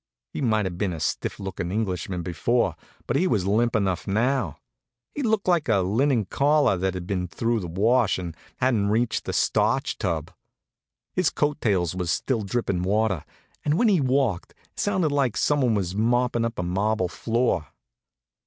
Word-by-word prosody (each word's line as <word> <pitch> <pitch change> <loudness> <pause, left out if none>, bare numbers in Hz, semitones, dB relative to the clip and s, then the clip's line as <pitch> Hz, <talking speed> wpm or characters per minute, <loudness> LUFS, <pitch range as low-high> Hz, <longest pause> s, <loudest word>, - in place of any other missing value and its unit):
He - - -4
might 110 -5 +2
have 90 -1 -4
been 100 -4 0
a 80 - -6
stiff - - -2
lookin' 95 -3 -4
Englishman 95 -4 -2
before, 115 +8 0 0.3
but 120 - -1
he 175 +7 +3
was 105 - +1
limp 115 +4 +2
enough 95 -4 0
now. 110 - 0 0.6
He 290 - -3
looked 220 -6 0
like 170 -7 +2
a 100 -4 +4
linen 115 +5 +1
collar 145 +1 +3
that 95 +1 -1
had 90 -1 -5
been 90 -2 -2
through 115 +5 -1
the 90 - -5
wash 110 +6 +2
and 85 -3 -6 0.2
hadn't 115 -6 +1
reached 115 +2 0
the - - -2
starch - - +1
tub. 80 0 -2 0.8
His 185 -4 +2
coat 150 0 -1
tails 95 -6 +1
was 90 -2 -3
still 115 +8 0
drippin' 100 -3 -1
water, 100 -2 +1 0.4
and 150 +2 +1
when 235 +1 +4
he 185 -7 +3
walked 130 -8 0 0.2
it - - -12
sounded 190 -7 +1
like 140 -5 +1
some 145 -1 +2
one 120 -4 +2
was 95 -3 -1
moppin' 120 +2 +1
up 115 0 -4
a 90 - -1
marble 95 +2 0
floor. 115 - 0
110 Hz, 180 wpm, -25 LUFS, 95-130 Hz, 0.8 s, a